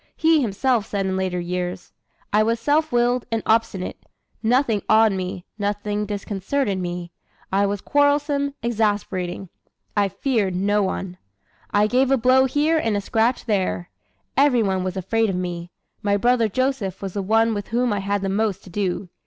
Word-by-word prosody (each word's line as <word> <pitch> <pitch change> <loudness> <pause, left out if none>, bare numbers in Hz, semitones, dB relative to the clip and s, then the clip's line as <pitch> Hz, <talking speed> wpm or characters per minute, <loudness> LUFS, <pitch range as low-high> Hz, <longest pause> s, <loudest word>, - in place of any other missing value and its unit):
He 320 -1 +3
himself 230 0 0
said 200 -1 -2
in 190 0 -1
later 185 -1 -1
years: 180 +1 -4 0.4
"I 210 - +5
was 230 +1 +1
self 300 +5 +1
willed 245 0 +1
and 225 -1 -1
obstinate, 220 -4 0 0.4
nothing 235 -2 +2
awed 220 0 +6
me, 185 -2 -4
nothing 205 +1 -2
disconcerted 205 +2 -2
me. 175 -1 -4 0.4
I 200 +1 +3
was 200 0 -2
quarrelsome, 285 -1 +1
exasperating; 205 -5 -1 0.5
I 205 -1 +2
feared 210 -5 0
no 205 +3 +2
one. 185 -1 -3 0.5
I 205 +1 +3
gave 255 +4 +2
a 270 - +4
blow 255 +2 +4
here 300 +5 +2
and 225 -7 0
a - - +1
scratch 225 +4 0
there. 190 -5 -1 0.4
Every 265 -4 +4
one 190 -2 0
was 185 0 -3
afraid 225 +4 +1
of 190 - -1
me. 175 -1 -4 0.3
My 205 -1 +2
brother 235 0 +2
Joseph 255 -5 -1
was 190 -2 -4
the 200 - -2
one 225 +3 +2
with 205 -2 -4
whom 240 0 +1
I 205 - -1
had 200 0 -1
the - - 0
most 200 0 -1
to 185 - -13
do. 190 0 -2
210 Hz, 170 wpm, -22 LUFS, 190-245 Hz, 0.5 s, awed